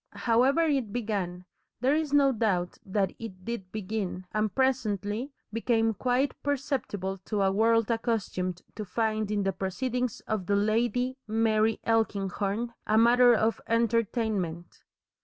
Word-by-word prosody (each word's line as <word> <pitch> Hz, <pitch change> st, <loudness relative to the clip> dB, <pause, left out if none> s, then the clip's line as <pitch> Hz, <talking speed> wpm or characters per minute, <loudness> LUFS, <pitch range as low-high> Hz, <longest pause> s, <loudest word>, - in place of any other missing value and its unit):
However 250 Hz, +6 st, +4 dB
it 275 Hz, -9 st, 0 dB
began, 200 Hz, -6 st, -3 dB, 0.3 s
there 260 Hz, +4 st, +2 dB
is 310 Hz, -2 st, -1 dB
no 280 Hz, -1 st, +5 dB
doubt 195 Hz, -7 st, -1 dB
that 195 Hz, 0 st, -1 dB
it 190 Hz, -5 st, -9 dB
did 225 Hz, -6 st, -5 dB
begin, 200 Hz, -3 st, -4 dB
and 215 Hz, -1 st, 0 dB
presently 235 Hz, -2 st, 0 dB, 0.2 s
became 225 Hz, -1 st, +1 dB
quite 255 Hz, +5 st, +1 dB
perceptible 260 Hz, -9 st, -2 dB
to 210 Hz, -3 st, 0 dB
a 190 Hz, -, +3 dB
world 225 Hz, +2 st, +3 dB
accustomed 200 Hz, -6 st, -2 dB
to 215 Hz, -, -4 dB
find 215 Hz, 0 st, -1 dB
in 205 Hz, -1 st, 0 dB
the 195 Hz, 0 st, 0 dB
proceedings 245 Hz, +6 st, -2 dB
of 210 Hz, -5 st, -3 dB
the 205 Hz, -, +2 dB
Lady 240 Hz, +5 st, +1 dB
Mary 220 Hz, 0 st, +2 dB
Elkinghorn 215 Hz, 0 st, 0 dB
a 215 Hz, -, +3 dB
matter 240 Hz, +1 st, +6 dB
of 220 Hz, +1 st, +1 dB
entertainment. 220 Hz, -6 st, -1 dB
220 Hz, 135 wpm, -28 LUFS, 200-240 Hz, 0.3 s, matter